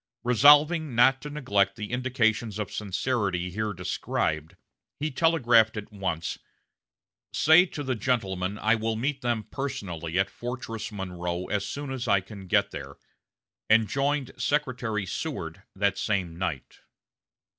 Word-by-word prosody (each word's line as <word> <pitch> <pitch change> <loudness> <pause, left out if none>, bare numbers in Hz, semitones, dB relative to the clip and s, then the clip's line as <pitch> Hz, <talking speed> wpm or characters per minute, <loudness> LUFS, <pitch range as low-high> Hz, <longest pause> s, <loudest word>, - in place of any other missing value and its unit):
Resolving 145 +4 +5
not 130 +3 +5
to 150 - -6
neglect 100 -9 +1
the 105 -1 -6
indications 120 -4 0
of 105 -2 -4
sincerity 100 -3 -1
here 110 +3 -2
described, 80 -4 -2 0.4
he 150 +2 -2
telegraphed 120 -8 +3
at 105 0 -6
once, 95 -5 -3 0.9
"Say 160 +5 +6
to 145 - -6
the 130 -1 -1
gentlemen 100 -5 -1
I 110 0 +2
will 110 0 0
meet 135 +5 -2
them 120 -3 -1
personally 95 - -4
at 95 - +1
Fortress 120 -3 -5
Monroe 90 -3 -4
as 100 -1 -1
soon 140 -1 -5
as 130 -2 -4
I 100 -2 +4
can 95 0 -11
get - - +2
there," 70 0 -7 0.7
and 110 0 +5
joined 140 +3 0
Secretary 125 -8 -1
Seward 95 - -5
that 100 0 +1
same 95 -6 -1
night. 85 -7 -4
110 Hz, 135 wpm, -27 LUFS, 95-130 Hz, 0.9 s, Say